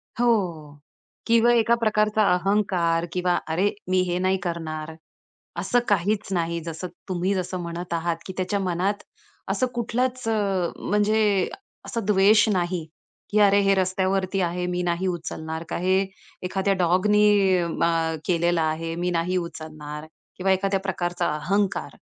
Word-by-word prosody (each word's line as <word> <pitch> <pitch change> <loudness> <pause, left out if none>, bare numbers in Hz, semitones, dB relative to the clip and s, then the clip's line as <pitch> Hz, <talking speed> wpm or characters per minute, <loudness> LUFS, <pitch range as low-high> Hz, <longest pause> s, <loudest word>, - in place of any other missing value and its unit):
हो 240 0 +1 1.0
किंवा 230 +1 +5
एका 235 0 +4
प्रकारचा 215 0 +2
अहंकार 180 -3 +1
किंवा 180 -1 +1
अरे, 180 +6 +1 0.2
मी 185 0 +3
हे 175 - 0
नाही 185 +1 +2
करणार. 160 -2 -4 0.7
असं 245 - +2
काहीच 200 +2 +1
नाही, 170 -1 -1
जसं 165 +2 -6 0.2
तुम्ही 185 +2 0
जसं 185 0 -3
म्हणत 170 +1 -5
आहात, 170 0 -1
की 185 - -6
त्याच्या 185 +2 -1
मनात 190 +2 -1 0.5
असं 255 - +1
कुठलाच, 250 +2 -1
म्हणजे 205 0 +1 0.4
असं 230 -4 -4
द्वेष 210 +2 +5
नाही. 175 -2 -1 0.5
की 210 - +3
अरे, 200 0 +5
हे 195 0 +3
रस्त्यावरती 190 0 0
आहे, 180 0 -1
मी 180 0 -1
नाही 175 +2 0
उचलणार, 160 -2 -4
का - - -2
हे 185 +2 +2 0.4
एखाद्या 190 +2 0
डॉगनी 195 +1 +4
म - - -2 0.4
केलेला 170 -1 +2
आहे, 165 +1 -2
मी 175 +1 -1
नाही 175 +2 0
उचलणार 155 -3 -6 0.3
किंवा 190 +1 +1
एखाद्या 195 +1 +1
प्रकारचा 175 -3 -2
अहंकार, 195 +6 -1
185 Hz, 135 wpm, -24 LUFS, 170-200 Hz, 1.0 s, किंवा